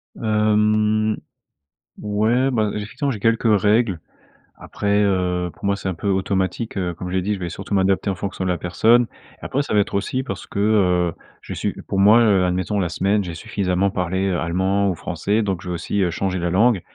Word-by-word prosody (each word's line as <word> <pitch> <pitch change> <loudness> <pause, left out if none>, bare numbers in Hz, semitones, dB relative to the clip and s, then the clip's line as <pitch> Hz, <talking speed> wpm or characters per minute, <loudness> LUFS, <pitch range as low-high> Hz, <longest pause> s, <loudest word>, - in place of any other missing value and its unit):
Hem, 110 0 +2 0.8
ouais, 110 +6 +1
bah, 110 -4 +1
effectivement, 110 +7 -3
j'ai 110 - -5
quelques 115 -1 +2
règles 105 -4 +2 0.6
après, 100 0 -1
heu, 90 -2 0
pour - - -10
moi, 100 - +2
c'est 95 -1 -4
un - - -2
peu 85 - -5
automatique, 95 +2 -1
heu, 90 -2 -1
comme 90 +2 -7
j'ai 95 0 0
dit: 105 +3 -1
«Je 95 - -4
vais 85 -1 -4
surtout 100 +5 -7
m'adapter 95 +1 +2
en 95 - -1
fonction 95 0 -4
de 90 - 0
la 90 - 0
personne». 115 +8 +3 0.4
Après, 140 - -1
ça 140 - -4
va 105 - +5
être - - -4
aussi 130 +6 -1
parce 95 -7 -6
que, 100 - -5
heu, 90 -5 +2 0.3
j'ai - - -7
su - - -4
pour 95 - 0
moi, 105 +4 +7
heu, 100 -5 +4
admettons 90 +3 -1
la 90 - 0
semaine, 100 +5 +1
j'ai 85 -3 -5
suffisamment 100 -1 -1
parlé 95 +1 -1
allemand 95 +4 0
ou 90 - -1
français 105 +6 -1
donc 95 -4 -2
je - - -10
vais 90 - -2
aussi, 95 +4 -2
heu, 90 - +1
changer 95 +1 -2
la 85 0 -1
langue, 105 +1 +3
100 Hz, 205 wpm, -21 LUFS, 90-105 Hz, 0.8 s, moi